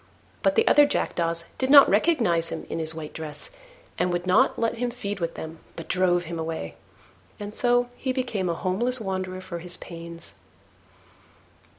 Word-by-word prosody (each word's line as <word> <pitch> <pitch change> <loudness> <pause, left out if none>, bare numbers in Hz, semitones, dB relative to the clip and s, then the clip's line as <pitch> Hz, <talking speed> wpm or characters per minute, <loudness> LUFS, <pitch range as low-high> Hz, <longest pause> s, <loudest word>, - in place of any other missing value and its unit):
But - - +2
the 455 - +3
other 290 0 +7
jackdaws 170 -8 -1
did 260 - 0
not 280 0 +10
recognise 205 - +2
him - - -5
in - - -2
his 160 0 -3
white 155 -2 -7
dress, 155 - -8 0.5
and 180 - +1
would 175 0 -2
not 185 - +4
let 230 0 0
him 245 +1 -1
feed 205 -5 -5
with 170 -1 -3
them, 160 0 -7 0.2
but 165 - -8
drove 180 -1 +2
him 165 0 -5
away: 160 - -4 0.7
and 205 0 -6
so 245 +1 +2
he 260 - -2
became 240 -8 -1
a 170 - 0
homeless 235 +9 0
wanderer 185 -2 -3
for 180 -2 -6
his 175 +1 -5
pains. 170 -1 -10
185 Hz, 175 wpm, -25 LUFS, 165-240 Hz, 0.7 s, not